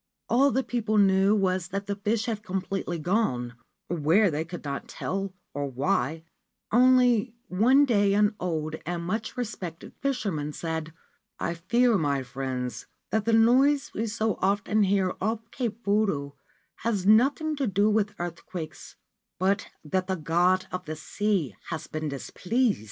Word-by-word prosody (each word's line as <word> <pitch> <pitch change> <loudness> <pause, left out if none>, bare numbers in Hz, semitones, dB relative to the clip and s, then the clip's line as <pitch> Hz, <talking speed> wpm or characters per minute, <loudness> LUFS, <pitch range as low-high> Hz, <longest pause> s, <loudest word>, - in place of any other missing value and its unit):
All 270 +4 +5
the 265 0 +1
people 220 -4 -1
knew 195 0 +5
was 185 -3 +1
that 200 +2 -4
the 200 - -2
fish 215 +3 -1
had 225 -4 -2
completely 190 -3 -3
gone 155 - 0 0.2
— - - -57
where 175 +5 +3
they 150 +1 -1
could 170 +2 -8
not 140 -1 -4
tell, 195 0 -3 0.2
or 145 0 -2
why, 140 +4 0 0.5
until 250 -1 +5 0.2
one 250 +10 +5
day 205 -5 +3
an 210 +1 +3
old 160 -3 -2
and 170 +1 -3
much 215 +7 -3
respected 190 -9 -5
fisherman 200 - -1
said: 160 -1 -4 0.3
' - - -54
I 170 - -1
fear, 235 +6 +2
my 140 -3 0
friends, 125 -1 -4 0.2
that 220 -1 +1
the 230 - +2
noise 260 +6 +4
we 225 +2 -2
so 220 -1 -1
often 205 +2 +2
hear 195 -2 +2
off 225 +3 -2
Cape 235 -2 -4
Fudo 200 -9 +1 0.4
has 210 -5 -1
nothing 275 +9 +4
to 275 -3 0
do 200 +1 +2
with 210 -1 +1
earthquakes, 170 -1 -7 0.4
but 195 +2 +1 0.2
that 185 +5 -1
the 190 - 0
God 175 +3 +2
of 180 0 -4
the 155 0 -4
Sea 170 - -1
has 160 -2 -4
been 155 -1 -4
displeased.' 210 - 0
195 Hz, 155 wpm, -27 LUFS, 165-220 Hz, 0.5 s, All